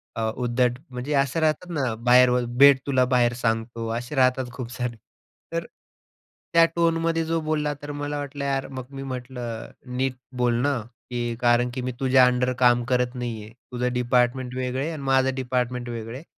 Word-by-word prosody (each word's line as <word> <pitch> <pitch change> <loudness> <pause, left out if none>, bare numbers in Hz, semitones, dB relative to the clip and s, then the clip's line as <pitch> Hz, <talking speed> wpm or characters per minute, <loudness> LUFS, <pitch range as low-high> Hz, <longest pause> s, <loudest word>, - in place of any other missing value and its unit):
अ, 115 - -3
उद्धट 125 0 0
म्हणजे 125 +3 -4
असं 140 +2 +1
राहतात 160 +3 0
ना, 130 -7 -1
बाहेर 125 +2 +5
ब 125 - +3 0.2
भेट 140 -1 +8
तुला 130 -2 +3
बाहेर 120 -1 +3
सांगतो, 115 0 -1
असे 120 +5 -5
राहतात 130 0 +3
खूप 120 -2 -6
सारे. 125 -2 -3 0.6
तर 165 0 -2 0.9
त्या 165 0 +7
टोनमध्ये 165 -1 +1
जो 165 +1 0
बोलला 155 -1 -1
तर 145 - -6
मला 145 0 -4
वाटलं 145 0 -5
यार 135 -1 -1
मग 130 -2 -7
मी 135 0 -7
म्हटलं, 125 -3 -6 0.3
"नीट 130 0 0 0.3
बोल 120 -1 +3
ना, 145 +1 +1 0.3
की 120 -1 -2
कारण 120 0 +3
की 130 - -3
मी 130 - -2
तुझ्या 130 -1 +5
अंडर 125 0 +1
काम 120 -1 +4
करत 125 0 +1
नाही 120 -3 -4
आहे, 110 - -12 0.2
तुझं 125 0 -1
डिपार्टमेंट 125 +1 +1
वेगळं 130 0 -2
आहे 155 - -1
आणि 155 -4 -6
माझं 130 0 +3
डिपार्टमेंट 125 -1 -2
वेगळं 115 -1 -5
आहे 135 - -8
125 Hz, 185 wpm, -24 LUFS, 120-140 Hz, 0.9 s, भेट